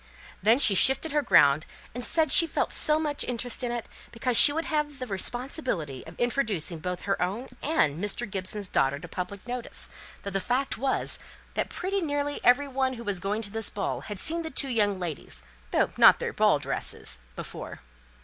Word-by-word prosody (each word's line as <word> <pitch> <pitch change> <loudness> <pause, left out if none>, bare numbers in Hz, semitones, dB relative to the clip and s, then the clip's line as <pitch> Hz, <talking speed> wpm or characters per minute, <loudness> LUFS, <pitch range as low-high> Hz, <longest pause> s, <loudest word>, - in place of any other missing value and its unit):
Then 220 +5 +5
she 225 -7 +4
shifted 265 - +3
her 295 0 +2
ground, 155 - +4 0.3
and 245 +1 -4
said 320 +4 +1
she 330 - +7
felt - - -1
so 300 0 +4
much 295 -2 -1
interest 245 +1 -3
in 240 - -1
it, 240 -2 -4 0.2
because 240 +1 -2
she 285 - +9
would 325 +3 -2
then - - -7
have 300 -2 -1
the 255 - -5
responsibility 200 - -3
of - - -12
introducing 220 - 0
both 180 +2 -4
her 195 0 -1
own 200 +9 -2
and 180 - +1
Mr. 210 +4 -2
Gibson's 195 +1 -2
daughter 135 -5 +1
to 170 +5 -9
public 180 +3 -6
notice, 245 -1 -6 0.3
though 200 - -4
the 195 - 0
fact 260 +5 -1
was 265 +2 +2 0.3
that - - -2
pretty 390 +2 -2
nearly 290 -2 -2
every 250 +4 +4
one 265 -1 -1
who 235 -2 -8
was 205 -4 -2
going 205 +4 -2
to 200 - -6
this 225 -1 -3
ball 205 - -3
had 210 -2 -7
seen 330 - -1
the 320 - -5
two 275 -1 -1
young 205 -5 +1
ladies 170 -5 -6 0.3
though - - +1
not - - +8
their - - -4
ball - - +3
dresses - - -1 0.2
before. - - -8
235 Hz, 195 wpm, -27 LUFS, 195-275 Hz, 0.3 s, she